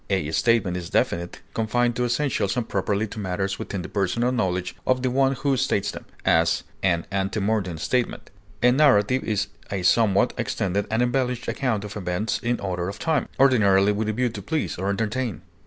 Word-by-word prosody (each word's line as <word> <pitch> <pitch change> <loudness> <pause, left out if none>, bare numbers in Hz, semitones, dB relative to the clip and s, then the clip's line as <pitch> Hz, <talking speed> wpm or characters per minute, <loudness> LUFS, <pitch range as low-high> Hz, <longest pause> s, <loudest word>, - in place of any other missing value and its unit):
A 95 -6 0
statement 110 -2 +2
is 90 -1 -6
definite, 85 +1 -1
confined 120 +2 +1
to 125 - 0
essentials 125 -5 0
and 120 -2 -1
properly 100 +2 0
to 110 - -8
matters 95 +1 -2
within 95 -3 -4
the - - -6
personal 110 +5 0
knowledge 95 -7 -1
of 130 0 +2
the 130 - +1
one 135 +1 +3
who 135 +1 0
states 100 -4 0
them; - - -9 0.2
as, 80 +1 +3 0.2
an 85 -3 +1
ante 95 +2 -1
mortem 100 -5 -1
statement. 125 +9 -2 0.3
A 125 - +6
narrative 130 -3 +4
is 105 -2 -1 0.2
a 100 -2 -2
somewhat 100 0 +3
extended 100 +1 -1
and 110 +2 +2
embellished 125 0 -1
account 115 -7 -1
of 105 -1 -7
events 90 +2 -2
in 120 +1 -1
order 90 -2 -2
of 100 - -7
time, 160 -1 0
ordinarily 105 -7 +5
with 105 +1 -1
a - - 0
view 125 +2 +1
to 115 - -7
please 160 -1 -2
or 95 +3 -2
entertain. 110 0 -2
105 Hz, 190 wpm, -24 LUFS, 95-125 Hz, 0.3 s, A